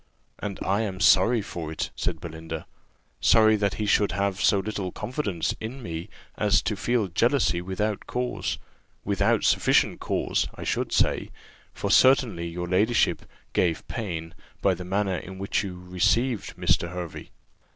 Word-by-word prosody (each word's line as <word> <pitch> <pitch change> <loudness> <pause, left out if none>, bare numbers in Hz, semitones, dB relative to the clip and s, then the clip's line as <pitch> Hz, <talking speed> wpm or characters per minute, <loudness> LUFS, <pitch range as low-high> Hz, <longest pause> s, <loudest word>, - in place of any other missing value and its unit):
"And 100 -2 -4
I 100 +4 +1
am 95 -4 -3
sorry 105 +4 +5
for 80 -4 -6
it," 80 - -3
said 85 -2 -2
Belinda; 80 -1 -7 0.5
"sorry 110 -1 +5
that 100 -1 0
he 105 - -2
should 100 -1 +3
have 100 +1 -1
so 100 - +4
little 100 -2 -3
confidence 100 - -2
in 120 +4 -6
me 85 +2 -5 0.3
as 105 -1 +3
to 105 +4 -1
feel 120 +2 +1
jealousy 115 -1 +2
without 100 +3 -2
cause 125 0 -2 0.5
without - - +2
sufficient - - +3
cause, - - 0
I - - -7
should - - -1
say; - - +1 0.4
for - - -3
certainly 125 -10 +4
your 90 +1 -4
ladyship 105 +6 +2 0.3
gave 85 -3 0
pain, 85 -8 -4 0.3
by 95 - +3
the 90 0 -6
manner 95 0 0
in 95 +1 -8
which 100 +2 -1
you 90 -3 -6
received 100 +5 0
Mr. 85 -1 +1
Hervey." 90 -2 -7
95 Hz, 150 wpm, -26 LUFS, 90-110 Hz, 0.5 s, sorry